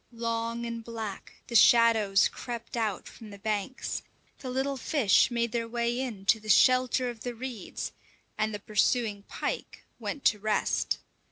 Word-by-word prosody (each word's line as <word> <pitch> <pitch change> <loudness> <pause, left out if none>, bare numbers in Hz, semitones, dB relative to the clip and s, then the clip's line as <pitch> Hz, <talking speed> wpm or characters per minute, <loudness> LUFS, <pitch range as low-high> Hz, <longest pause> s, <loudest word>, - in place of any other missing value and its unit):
Long 230 0 -2
and 230 -1 -5
black, 220 -4 -7
the 235 - -7
shadows 225 -4 +6
crept 240 -1 -7
out 215 -5 -2
from 220 - -12
the 200 - -10
banks; 215 +4 -3 0.4
the 260 - -6
little 265 +2 -1
fish 255 - +3
made 235 -1 -1
their 230 0 -1
way 235 +1 -1
in 220 -7 -5
to 220 +2 +4
the 215 0 -10
shelter 255 +2 +4
of 230 -2 -14
the 245 0 -4
reeds, 240 -4 -5 0.4
and 215 0 0
the 210 - -3
pursuing 210 +1 +1
pike - - -4 0.2
went 285 - -5
to 210 - +4
rest. 215 +1 0
230 Hz, 160 wpm, -29 LUFS, 215-245 Hz, 0.4 s, shadows